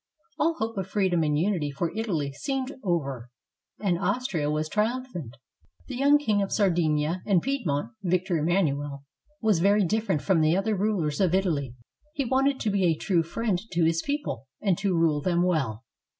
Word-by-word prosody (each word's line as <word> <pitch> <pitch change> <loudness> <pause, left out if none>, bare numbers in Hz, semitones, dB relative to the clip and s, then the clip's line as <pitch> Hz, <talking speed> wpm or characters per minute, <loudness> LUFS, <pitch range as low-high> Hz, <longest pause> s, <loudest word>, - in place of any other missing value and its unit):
All 330 +1 +2
hope 225 -3 -3
of 190 - -3
freedom 190 -4 +1
and 150 -2 +1
unity 170 -3 0
for 160 +6 -3
Italy 165 -11 -2
seemed 270 - -3
over, 140 - -2 0.5
and 180 -5 0
Austria 195 - -1
was 155 +1 -1
triumphant. 210 - -2 0.5
The 260 - -6
young 280 +3 +5
King 215 -8 +1
of 195 - -2
Sardinia 170 -4 +1
and 195 -4 +4
Piedmont, 195 - -2
Victor 180 -1 0
Emmanuel, 145 -4 0 0.4
was 215 -6 +3
very 200 +3 +4
different 215 -5 0
from 185 -5 +3
the 155 +3 +3
other 215 +2 0
rulers 190 -6 0
of 185 -2 +3
Italy. 150 -10 0 0.4
He 280 - -1
wanted 265 +2 +2
to 215 - 0
be 195 -2 +2
a 165 -2 +3
true 175 -2 +1
friend 190 +3 -1
to 170 0 +2
his 165 0 +2
people 140 - -3
and 195 -4 +2
to 195 -3 0
rule 160 -3 +2
them 175 +1 +1
well. 135 -11 0
180 Hz, 175 wpm, -26 LUFS, 155-215 Hz, 0.5 s, young